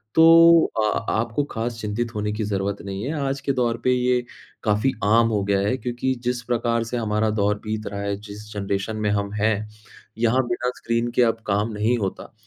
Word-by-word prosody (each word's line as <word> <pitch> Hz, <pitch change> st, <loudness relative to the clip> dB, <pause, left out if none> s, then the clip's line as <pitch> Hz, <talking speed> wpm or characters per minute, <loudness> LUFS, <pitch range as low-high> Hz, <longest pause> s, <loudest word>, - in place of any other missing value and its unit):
तो 165 Hz, 0 st, +8 dB
अ, 110 Hz, +1 st, 0 dB
आपको 115 Hz, +5 st, 0 dB
ख़ास 115 Hz, +1 st, -3 dB
चिंतित 115 Hz, +3 st, -3 dB
होने 105 Hz, 0 st, -1 dB
की 110 Hz, +1 st, -2 dB
ज़रूरत 100 Hz, -1 st, -2 dB
नहीं 100 Hz, +1 st, -5 dB
है। 140 Hz, +6 st, -2 dB
आज 135 Hz, 0 st, -2 dB
के 140 Hz, -, 0 dB
दौर 120 Hz, -3 st, 0 dB
पे 130 Hz, -, +3 dB
ये 125 Hz, 0 st, +2 dB, 0.4 s
काफ़ी 105 Hz, +5 st, +2 dB
आम 115 Hz, +3 st, +4 dB
हो 105 Hz, -3 st, 0 dB
गया 100 Hz, 0 st, +1 dB
है 100 Hz, +5 st, +1 dB
क्योंकि 125 Hz, +1 st, -2 dB
जिस 125 Hz, 0 st, -1 dB
प्रकार 115 Hz, -1 st, 0 dB
से 115 Hz, +2 st, -4 dB
हमारा 110 Hz, -1 st, 0 dB
दौर 105 Hz, -1 st, +1 dB
बीत 110 Hz, -1 st, -4 dB
रहा 100 Hz, 0 st, -5 dB
है 100 Hz, 0 st, -1 dB
जिस 105 Hz, 0 st, -10 dB
जनरेशन 100 Hz, +1 st, -2 dB
में 105 Hz, -1 st, 0 dB
हम 100 Hz, 0 st, -1 dB
हैं 105 Hz, +1 st, +2 dB, 0.6 s
यहाँ 120 Hz, +3 st, +2 dB
बिना 120 Hz, +1 st, -1 dB
स्क्रीन 115 Hz, +1 st, -1 dB
के -, -, +4 dB
अब 115 Hz, -1 st, +1 dB
काम 105 Hz, +2 st, 0 dB
नहीं 110 Hz, +4 st, +1 dB
होता। 100 Hz, -1 st, -4 dB
110 Hz, 200 wpm, -23 LUFS, 105-120 Hz, 0.6 s, तो